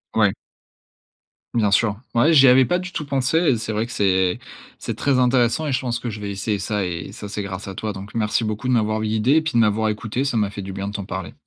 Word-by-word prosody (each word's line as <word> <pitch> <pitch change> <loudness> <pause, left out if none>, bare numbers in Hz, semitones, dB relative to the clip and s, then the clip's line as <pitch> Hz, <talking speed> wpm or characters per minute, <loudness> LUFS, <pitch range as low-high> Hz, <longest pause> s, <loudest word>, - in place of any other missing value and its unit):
Ouais. - - +4 1.2
Bien 110 -3 +3
sûr. 105 +1 +2 0.2
Ouais, 145 +8 +4
j'y 135 -3 +7
avais 130 +1 +6
pas 180 +5 +1
du 180 0 -7
tout 150 - -4
pensé, 135 +2 0
et 160 -8 +3
c'est 110 0 -4
vrai 110 +2 0
que 120 - -10
c'est 95 -3 +1 0.4
c'est - - -4
très 135 -3 +2
intéressant, 125 +4 +2
et - - -1
je 130 - +1
pense 120 -3 -2
que 120 - -4
je 105 -1 -6
vais 100 -1 -4
essayer 100 +2 -2
ça. 105 0 -2
Et 85 -2 -4
ça, 105 - -8
c'est 105 0 -4
grâce 95 0 -6
à 95 - -6
toi. 105 +1 -3
Donc 100 +1 -10
merci 110 +1 0
beaucoup 110 +3 -3
de 130 - +2
m'avoir 110 -2 +1
guidé 110 +4 +1
et 160 - +5
puis 160 - -3
de 120 - +3
m'avoir 110 0 +2
écouté. 110 +4 -2
Ça 135 - -1
m'a 105 -3 +1
fait 100 0 -7
du 95 0 -7
bien 100 +1 -4
de 100 - -5
t'en 100 -2 -4
parler. 95 -2 -6
110 Hz, 265 wpm, -22 LUFS, 100-125 Hz, 1.2 s, j'y